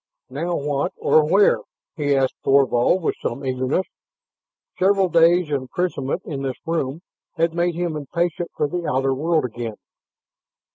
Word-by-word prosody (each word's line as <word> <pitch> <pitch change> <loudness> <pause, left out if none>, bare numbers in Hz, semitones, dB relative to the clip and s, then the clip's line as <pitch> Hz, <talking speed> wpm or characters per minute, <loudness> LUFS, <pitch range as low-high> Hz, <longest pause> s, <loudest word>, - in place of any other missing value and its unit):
"Now 170 +6 -2
what, 140 -1 -1
or 155 - +4
where?" 200 +3 +5 0.4
he 145 -4 +1
asked 135 -1 +1
Thorvald 135 +5 +3
with - - +1
some 135 +4 -3
eagerness. 130 +7 0 0.9
Several 195 0 +3
days' 170 -1 +4
imprisonment 140 +3 -2
in 140 -4 -5
this 135 -2 -3
room 160 -2 -2 0.3
had 165 -1 +1
made 170 0 0
him 170 -2 -2
impatient 170 +4 -2
for 150 - +1
the 175 +1 -4
outer 135 -1 +1
world 155 +2 +1
again. 115 -2 -5
155 Hz, 140 wpm, -22 LUFS, 135-175 Hz, 0.9 s, where